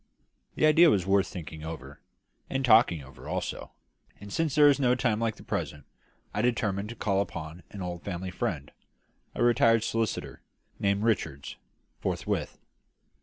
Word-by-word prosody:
The - - +3
idea 160 +2 +7
was 95 - +2
worth 95 0 +3
thinking 80 -3 -8
over, 75 -4 -8 0.5
and 135 0 -1
talking 110 - +5
over 65 0 -12
also; - - -4 0.5
and, 100 0 -9
since 160 -4 0
there 150 -1 +7
is 145 -1 +4
no 125 -2 +3
time 115 -4 0
like 115 -2 0
the - - -14
present, 75 -2 -4 0.5
I 105 - 0
determined 105 -4 0
to 120 - -7
call 100 -3 +1
upon 85 -3 -6
an 100 -2 -7
old 90 -1 -5
family 90 -1 -5
friend 70 -4 -3 0.6
a - - 0
retired 115 -2 +4
solicitor, 115 -1 -2 0.4
named 100 +1 +1
Richards 80 -11 -1 0.4
forthwith. - - -2
100 Hz, 155 wpm, -28 LUFS, 85-120 Hz, 0.6 s, idea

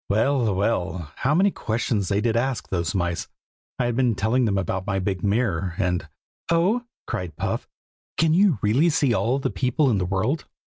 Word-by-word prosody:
Well, 115 0 +2
well, 95 -6 -1
how 140 +4 +1
many 195 +3 +4
questions 110 - -1
they 100 +1 +1
did 115 0 +1
ask, 125 +1 -1
those 85 -2 -1
mice. 85 -2 -1 0.5
I 125 - 0
had 120 -1 0
been 125 -3 +2
telling 110 +6 +1
them 100 -3 +1
about 95 0 -2
my 100 -1 0
big 95 -1 -2
mirror, 100 -5 0
and 90 -5 -1 0.4
"Oh!" 190 +9 +2 0.2
cried 90 -4 -4
Puff, - - -3 0.5
"can 160 -1 +3
you 190 -3 +4
really 130 +11 +3
see 145 -5 +2
all 120 +3 +1
the 135 - -2
people 130 +2 +1
in 105 - +1
the 90 - 0
world?" 105 - -1
110 Hz, 185 wpm, -24 LUFS, 95-135 Hz, 0.5 s, many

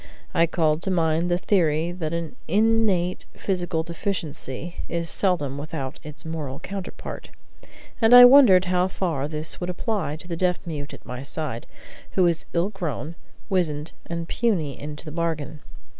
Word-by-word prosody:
I 170 -2 +4
called 160 -2 +1
to 190 - -1
mind 165 -1 +1
the 175 - +2
theory 170 -4 +1
that 170 -3 -4
an 170 -2 -4
innate 205 -2 +2
physical 175 -4 -1
deficiency 170 -3 -4
is 170 -1 -2
seldom 145 -8 0
without 145 -3 -5
its 150 +2 -10
moral 150 -5 -4
counterpart, 195 -1 -7 0.7
and 225 0 +5
I 245 0 +12
wondered 245 -9 +8
how 180 0 +2
far 165 -7 -2
this 155 +2 -4
would 175 - -2
apply 180 -3 -2
to 165 +3 -11
the 170 - -3
deaf 180 +1 +1
mute 145 -4 -5
at - - -17
my 125 0 -6
side, 140 -4 -4 0.5
who 185 - +3
was 170 -2 +2
ill 175 +3 +1
grown, 170 - -4 0.3
wizened, 160 -6 0 0.2
and 170 0 -4
puny 175 - 0
into 150 +2 -7
the 155 - -6
bargain. 160 -2 -2
170 Hz, 160 wpm, -24 LUFS, 155-185 Hz, 0.7 s, I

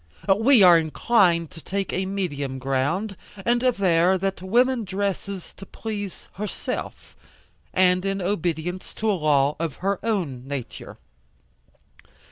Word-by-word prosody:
We 225 +1 +5
are 175 -2 +8
inclined 170 0 +2
to 160 - -11
take 195 +3 -3
a 190 0 -1
medium 145 -9 -3
ground, 140 +11 -1 0.3
and 240 0 +2
aver 190 -7 +3
that 195 0 -2
woman 240 +5 +2
dresses 195 -1 -4
to 195 - -10
please 205 -4 -6
herself, 210 +1 -5 0.6
and 180 0 +3
in 195 0 -1
obedience 180 -1 -2
to 220 0 0
a - - +2
law 150 -4 +2
of 165 -4 -2
her 195 -1 +1
own 165 - -2
nature. 140 -4 -6
185 Hz, 125 wpm, -24 LUFS, 165-200 Hz, 0.6 s, are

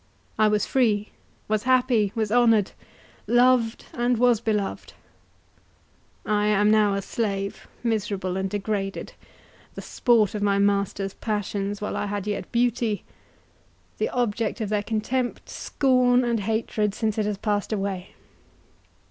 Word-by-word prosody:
I 215 - +5
was 210 -1 +1
free, 215 -5 +1 0.4
was 215 -1 +1
happy, 245 -5 +2
was 220 -2 -1
honoured, 230 -4 +4 0.6
loved, 240 -1 +3
and 240 0 +1
was 240 -2 +3
beloved. 210 -4 -2 1.3
I 210 0 +1
am 210 0 +3
now 210 -2 +4
a 200 - -2
slave, 200 -3 -3 0.2
miserable 200 -5 -1
and 190 0 -1
degraded—the 200 -1 -6
sport 230 -4 +2
of 210 - -3
my 200 -1 +2
masters' 200 -1 0
passions 205 -1 -3
while 210 - -3
I - - -2
had 205 -1 -3
yet 210 -1 -4
beauty—the 235 -3 -4
object 230 -2 -1
of 215 -3 -2
their 210 -1 +1
contempt, 235 +4 -2
scorn, 255 -2 +2
and 235 -2 0
hatred, 215 0 -1
since 220 -1 -1
it 210 - 0
has 210 -1 -2
passed 205 0 -1
away. 195 -3 -3
210 Hz, 130 wpm, -25 LUFS, 205-235 Hz, 1.3 s, I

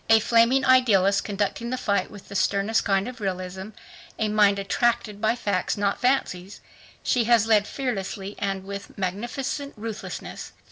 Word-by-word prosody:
A 225 0 +7
flaming 235 +4 +3
idealist, 200 -7 +4
conducting 210 +3 -2
the 255 - -2
fight 200 -5 0
with 205 -2 -13
the - - -10
sternest 200 +3 +1
kind 195 0 +1
of 250 -2 -8
realism, 190 0 -4 0.5
a 215 -1 0
mind 205 -1 +4
attracted 210 +1 0
by 220 +1 +2
facts, 205 -6 -1
not 200 -1 0
fancies, 205 -7 0 0.4
she 240 -3 +2
has 230 -1 +4
led 215 -2 +3
fearlessly 200 -6 -4
and 195 -1 -2
with 200 +1 -8
magnificent 240 +9 -3
ruthlessness. 220 0 -7
210 Hz, 150 wpm, -25 LUFS, 195-235 Hz, 0.5 s, A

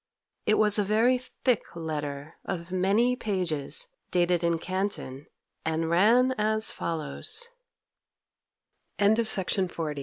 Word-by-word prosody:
It 215 - +5
was 210 0 +4
a - - +3
very 225 +5 +3 0.2
thick 250 -9 +1
letter, 150 -2 -4
of 180 -1 -5
many 200 +7 +2
pages, 185 - -2 0.2
dated 175 -1 +2
in 170 -1 +2
Canton, 185 -7 -3 0.4
and 160 0 -1
ran 230 +9 +5
as 215 +1 +1
follows: 170 - -3 1.5
CHAPTER 210 +3 +4
X 180 -7 0
185 Hz, 110 wpm, -27 LUFS, 165-215 Hz, 1.5 s, It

